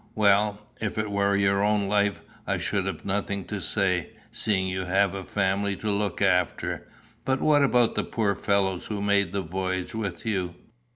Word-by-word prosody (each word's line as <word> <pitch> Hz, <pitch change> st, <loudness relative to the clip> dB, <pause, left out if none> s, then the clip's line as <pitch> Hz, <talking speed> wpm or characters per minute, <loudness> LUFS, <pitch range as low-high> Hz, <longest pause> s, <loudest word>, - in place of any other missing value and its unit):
"Well, 105 Hz, 0 st, +3 dB, 0.2 s
if 110 Hz, -1 st, -3 dB
it 110 Hz, -1 st, -1 dB
were 100 Hz, 0 st, +2 dB
your 100 Hz, 0 st, +2 dB
own 105 Hz, -1 st, +2 dB
life 100 Hz, 0 st, +1 dB, 0.3 s
I -, -, +1 dB
should 95 Hz, -2 st, -1 dB
have 95 Hz, -5 st, -5 dB
nothing 100 Hz, -1 st, -2 dB
to 105 Hz, -2 st, -4 dB
say, 90 Hz, -3 st, 0 dB, 0.2 s
seeing 95 Hz, -4 st, 0 dB
you 95 Hz, 0 st, -2 dB
have 95 Hz, +2 st, +2 dB
a 95 Hz, -1 st, -5 dB
family 100 Hz, +1 st, 0 dB
to 105 Hz, +2 st, -2 dB
look 100 Hz, -1 st, -1 dB
after; 90 Hz, -3 st, +1 dB, 0.4 s
but 130 Hz, 0 st, 0 dB
what 150 Hz, -1 st, +4 dB
about 125 Hz, -4 st, +3 dB
the -, -, 0 dB
poor 105 Hz, -3 st, 0 dB
fellows 95 Hz, -2 st, 0 dB
who 105 Hz, -2 st, -3 dB
made 100 Hz, -3 st, +2 dB
the 100 Hz, -1 st, -2 dB
voyage 95 Hz, +1 st, -3 dB
with 110 Hz, -1 st, -4 dB
you? 95 Hz, -5 st, -1 dB
100 Hz, 180 wpm, -26 LUFS, 95-105 Hz, 0.4 s, what